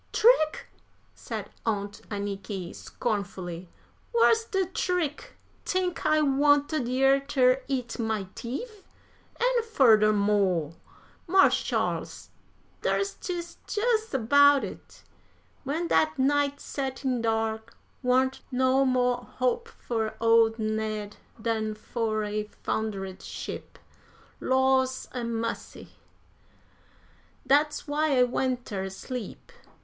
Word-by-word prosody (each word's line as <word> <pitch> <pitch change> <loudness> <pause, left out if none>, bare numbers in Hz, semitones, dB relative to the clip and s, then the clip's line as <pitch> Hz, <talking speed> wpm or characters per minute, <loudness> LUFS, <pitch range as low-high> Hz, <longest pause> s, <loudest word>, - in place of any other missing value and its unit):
"Trick!" 370 -10 +4 0.5
said - - -6
Aunt 205 -2 -2
Anniky, 200 -3 -4
scornfully, 185 -5 -4 0.4
"whar's 455 -1 +4
de 385 -3 0
trick? 355 -4 -2 0.3
Tink 365 -2 -1
I 310 0 +4
wanted 290 0 +3
yer 270 +2 +4
ter 265 -2 +2
eat 250 -4 -3
my 220 -3 -1
teef? 405 - -6 0.6
An' - - +2
furder 225 - +5
mo', 200 -6 +1 0.5
Marsh 380 +2 +5
Sharles, - - -2 0.5
dar's 395 0 0
jes' 345 -1 -4
dis 445 0 0
about 285 +3 +5
it: - - -9 0.6
when 320 +6 -1
dat 310 -2 +2
night 285 +1 +2
set 270 -1 -5
in 250 -3 +1
dar 225 -1 0 0.4
warn't 260 +1 +2
no 260 +1 +3
mo' 250 -2 +2 0.2
hope 255 - 0
fur 225 - -3
old 225 0 +4
Ned 215 -1 -3 0.2
dan 220 -1 -1
fur 215 0 -2
a 210 0 -2 0.2
foundered 195 -4 -3
sheep. - - -7 0.6
Laws 260 0 +2
a 250 -2 -4
massy! 230 0 -4 1.6
dat's 300 +2 +2
why 295 -1 +1
I 250 - +6
went 250 0 -1
ter 190 -2 -4
sleep. 235 +3 -7
255 Hz, 105 wpm, -27 LUFS, 220-290 Hz, 1.6 s, I